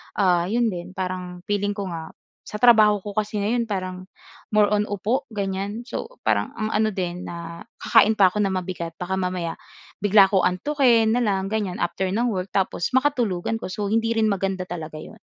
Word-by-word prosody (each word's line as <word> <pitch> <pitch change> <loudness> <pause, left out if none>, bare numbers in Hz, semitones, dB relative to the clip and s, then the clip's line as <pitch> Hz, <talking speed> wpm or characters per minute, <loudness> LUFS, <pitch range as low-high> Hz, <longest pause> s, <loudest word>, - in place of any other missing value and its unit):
ah, 180 -3 +2
'yon 230 +2 +1
din, 180 +1 -7
parang 180 -1 -5
feeling 205 +1 -1
ko 205 - -3
nga 160 -1 -7 0.3
sa 210 - -7
trabaho 215 -4 +6
ko 205 +1 -8
kasi 210 -1 -1
ngayon 230 +3 0
parang 185 -3 -4 0.5
more 210 -1 +5
on 210 0 +1
upo 215 +7 -1
ganyan. 200 +2 -3
So 450 - -7
parang - - 0
ang 215 -1 -3
ano 215 0 +1
din 180 -1 -4
na 170 +2 -8 0.2
kakain 220 -1 +5
pa 195 -3 +5
ako 185 - -7
na 195 - -1
mabigat, 180 -2 -4
baka 190 +1 -2
mamaya 180 -3 -2 0.4
bigla 200 -1 +5
ko 190 -3 +2
antukin 230 +3 +3
na 245 - +1
lang 195 -2 0
ganyan 205 -4 -2
after 175 +2 -1
ng 225 +6 0
work. 190 -3 -4
Tapos 190 +2 -1
makatulugan 240 -7 +1
ko, - - -7
so, 200 +2 -3
hindi 225 +1 +1
rin 220 -1 +2
maganda 195 -1 -1
talaga 155 -3 -6
'yon. - - -12
200 Hz, 190 wpm, -23 LUFS, 185-220 Hz, 0.5 s, trabaho